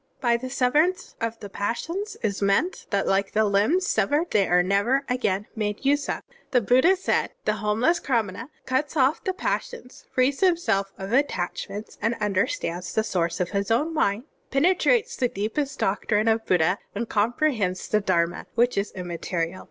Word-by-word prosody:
"By 240 Hz, -3 st, +2 dB
the 255 Hz, +2 st, -4 dB
severance 295 Hz, +8 st, +1 dB
of 230 Hz, 0 st, -2 dB
the 205 Hz, -, -6 dB
passions 330 Hz, -, -3 dB
is 205 Hz, -3 st, -1 dB
meant 200 Hz, -, +1 dB
that 200 Hz, -1 st, 0 dB
like 195 Hz, 0 st, +1 dB
the 220 Hz, 0 st, +3 dB
limbs 210 Hz, -, +2 dB
severed 290 Hz, -, +1 dB
they 200 Hz, -2 st, +3 dB
are 180 Hz, 0 st, +4 dB
never 205 Hz, +9 st, +1 dB
again 210 Hz, -6 st, 0 dB
made 210 Hz, +2 st, -3 dB
use 285 Hz, +1 st, +2 dB
of. -, -, -3 dB
(2) -, -, -35 dB, 0.2 s
The 255 Hz, -3 st, +3 dB
Buddha 260 Hz, -, +4 dB
said: 380 Hz, -, 0 dB
"The 215 Hz, 0 st, +1 dB
homeless 220 Hz, -, +1 dB
Qra 240 Hz, -8 st, +1 dB
mana 230 Hz, +7 st, -8 dB, 0.2 s
cuts 270 Hz, +4 st, -1 dB
off 270 Hz, +2 st, +2 dB
the 375 Hz, -, 0 dB
passions, 370 Hz, -, -4 dB
frees 265 Hz, +2 st, +1 dB
himself 335 Hz, -, +2 dB
of 195 Hz, +3 st, -5 dB
attachments, 205 Hz, -5 st, -2 dB
tmderstands 210 Hz, -, -1 dB
the 220 Hz, -, +2 dB
source 170 Hz, -5 st, -1 dB
of 180 Hz, -, -1 dB
his 200 Hz, -1 st, -1 dB
own 295 Hz, +9 st, +1 dB
mind, 205 Hz, -7 st, +1 dB, 0.3 s
penetrates 380 Hz, -, +2 dB
the 250 Hz, -, +2 dB
deepest 255 Hz, +7 st, -3 dB
doctrine 210 Hz, +2 st, 0 dB
of 225 Hz, 0 st, +1 dB
Buddha, 180 Hz, +2 st, +2 dB, 0.2 s
and 230 Hz, +3 st, -2 dB
comprehends 220 Hz, -, 0 dB
the 215 Hz, -, +2 dB
Dharma 175 Hz, -3 st, 0 dB
which 240 Hz, -2 st, +2 dB
is 200 Hz, -, -2 dB
immaterial. 175 Hz, -1 st, -3 dB
225 Hz, 170 wpm, -25 LUFS, 200-275 Hz, 0.3 s, are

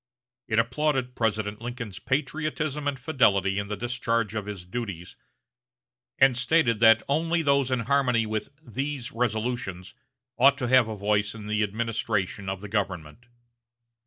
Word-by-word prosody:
It 110 Hz, -, 0 dB
applauded 130 Hz, +2 st, +1 dB
President 110 Hz, -2 st, -1 dB
Lincoln's 115 Hz, -5 st, -6 dB
patriotism 150 Hz, +2 st, -2 dB
and 140 Hz, -2 st, -2 dB
fidelity 100 Hz, -, +2 dB
in 100 Hz, -, -4 dB
the 105 Hz, 0 st, -4 dB
discharge 115 Hz, -2 st, -1 dB
of 105 Hz, -2 st, -4 dB
his 100 Hz, -4 st, -6 dB
duties, 95 Hz, -4 st, -6 dB, 1.0 s
and 130 Hz, -1 st, +5 dB
stated 125 Hz, -3 st, +2 dB
that 115 Hz, -1 st, +6 dB
only 165 Hz, +3 st, +1 dB
those 140 Hz, -2 st, +2 dB
in 130 Hz, -2 st, 0 dB
harmony 125 Hz, -2 st, +2 dB
with 110 Hz, +2 st, -3 dB, 0.2 s
"these 135 Hz, +2 st, -4 dB
resolutions" 110 Hz, -5 st, -2 dB, 0.5 s
ought 140 Hz, +2 st, +6 dB
to 125 Hz, -, -2 dB
have 130 Hz, -2 st, +5 dB
a 110 Hz, -, -4 dB
voice 105 Hz, +1 st, 0 dB
in 105 Hz, -2 st, -9 dB
the 105 Hz, 0 st, 0 dB
administration 105 Hz, -2 st, -2 dB
of 95 Hz, 0 st, -4 dB
the 105 Hz, -, -7 dB
government. 100 Hz, 0 st, -3 dB
115 Hz, 145 wpm, -26 LUFS, 105-130 Hz, 1.0 s, that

